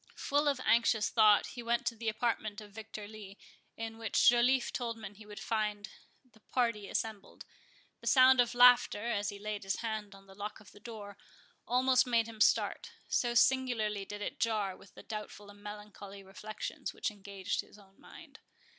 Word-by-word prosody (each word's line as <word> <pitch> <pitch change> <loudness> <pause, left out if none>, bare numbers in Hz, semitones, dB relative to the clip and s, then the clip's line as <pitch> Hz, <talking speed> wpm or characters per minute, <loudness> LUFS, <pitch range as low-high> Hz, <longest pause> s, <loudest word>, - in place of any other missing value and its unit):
Full 290 +1 0
of 280 -3 +1
anxious 230 -2 +3
thought, 215 -2 +5
he 245 - -6
went 235 0 0
to 230 - -1
the 225 0 -2
apartment 215 -1 -2
of 210 -1 -12
Victor 215 0 -8
Lee, 205 -2 -11 0.4
in 225 0 -6
which 225 -1 +2
Joliffe 245 +2 +4
told 240 -5 -3
him 210 -2 -8
he 210 +1 -15
would 210 0 -9
find 210 -1 -2 0.4
the 235 -3 -24
party 225 -4 -1
assembled. 220 -3 -4 0.5
The - - -9
sound 260 -1 +7
of 240 0 -1
laughter, 245 -3 +6
as 205 -2 -1
he 205 - -7
laid 210 0 -4
his 195 -1 -1
hand 215 -3 -4
on 195 0 -16
the 195 - -15
lock 205 +2 -6
of 210 - -16
the - - -16
door, 205 -3 -9 0.5
almost 255 +2 +3
made 230 -2 +3
him 220 -1 -9
start, 470 - +2 0.2
so 240 -1 +1
singularly 235 -6 +2
did 205 +1 -7
it - - -5
jar 210 -4 0
with 195 - -18
the - - -12
doubtful 210 -1 -7
and 205 0 -17
melancholy 205 -1 -9
reflections 210 +3 -6
which - - -2
engaged 200 -2 -4
his - - -18
own 195 -1 -21
mind. - - -14
215 Hz, 185 wpm, -32 LUFS, 205-235 Hz, 0.5 s, sound